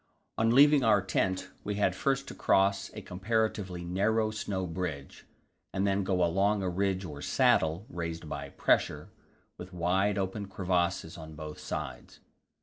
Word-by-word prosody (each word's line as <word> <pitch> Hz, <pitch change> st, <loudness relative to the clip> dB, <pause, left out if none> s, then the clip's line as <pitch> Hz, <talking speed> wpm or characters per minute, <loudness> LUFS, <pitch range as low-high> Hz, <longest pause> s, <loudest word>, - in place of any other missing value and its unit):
On 115 Hz, 0 st, +2 dB
leaving 145 Hz, 0 st, +7 dB
our 110 Hz, -3 st, +5 dB
tent 95 Hz, -1 st, -1 dB
we 105 Hz, -, -2 dB
had 100 Hz, -3 st, +1 dB
first 135 Hz, +4 st, 0 dB
to -, -, -7 dB
cross 100 Hz, 0 st, +2 dB
a 105 Hz, -, -7 dB
comparatively 95 Hz, -2 st, -1 dB
narrow 110 Hz, +5 st, +1 dB
snow 100 Hz, -3 st, -3 dB
bridge, 80 Hz, -5 st, -5 dB, 0.4 s
and 95 Hz, +1 st, 0 dB
then 100 Hz, 0 st, +1 dB
go 95 Hz, -1 st, +1 dB
along 100 Hz, +4 st, +1 dB
a 95 Hz, -, 0 dB
ridge 95 Hz, +1 st, -1 dB
or 75 Hz, -4 st, -7 dB
saddle, 80 Hz, +7 st, +2 dB
raised 85 Hz, -2 st, -5 dB
by 70 Hz, -1 st, -5 dB
pressure, -, -, +1 dB, 0.5 s
with 90 Hz, +1 st, -8 dB
wide 95 Hz, +4 st, +1 dB
open 100 Hz, +1 st, -2 dB
crevasses 90 Hz, -3 st, -1 dB
on 80 Hz, -1 st, -9 dB
both 75 Hz, 0 st, -8 dB
sides. -, -, -6 dB
95 Hz, 150 wpm, -30 LUFS, 85-105 Hz, 0.5 s, leaving